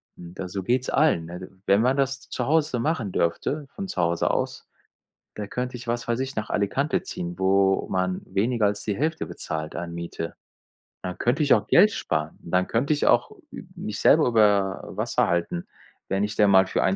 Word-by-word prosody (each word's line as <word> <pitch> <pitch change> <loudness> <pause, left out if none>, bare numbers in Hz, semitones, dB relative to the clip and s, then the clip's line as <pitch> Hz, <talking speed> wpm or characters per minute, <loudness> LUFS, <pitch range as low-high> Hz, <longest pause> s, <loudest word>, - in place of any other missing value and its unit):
Da 90 +2 -8
so 95 +1 -5
geht's 125 +5 0
allen, 140 - +2
ne? 90 +2 -8 0.2
Wenn 100 +2 +5
man 130 +3 +3
das 135 0 -1
zu 125 - -2
Hause 150 -5 +2
machen 130 - -1
dürfte 135 - -1
von 195 -1 -5
zu 90 - -2
Hause 85 0 +1
aus, - - -3 0.7
da 105 - -5
könnte 125 0 -3
ich, 120 0 -10
was 120 0 -2
weiß 120 +2 -1
ich, 135 +1 -4
nach 110 - -3
Alicante 135 +9 0
ziehen, 85 0 -5
wo 95 0 +2
man 90 0 -1
weniger 110 +3 +1
als 105 0 -1
die 105 -2 -1
Hälfte 155 +3 -1
bezahlt 80 0 -5
an 85 0 -5
Miete. 85 -1 -5 0.7
Dann 90 -1 -5
könnte 140 +6 +1
ich 145 - +5
auch - - +2
Geld 210 - +6
sparen. 75 - -2
Dann 90 +2 0
könnte 125 +6 0
ich 145 - 0
auch - - +3 0.2
ü 265 - -7
mich 105 - -5
selber 155 -1 +5
über 105 -4 +3
Wasser - - 0
halten, 85 0 -1 0.4
wenn 95 +1 +1
ich 105 0 -2
denn 105 -1 +5
mal 95 -1 +6
für - - 0
1, 95 0 +2
105 Hz, 200 wpm, -25 LUFS, 90-130 Hz, 0.7 s, Geld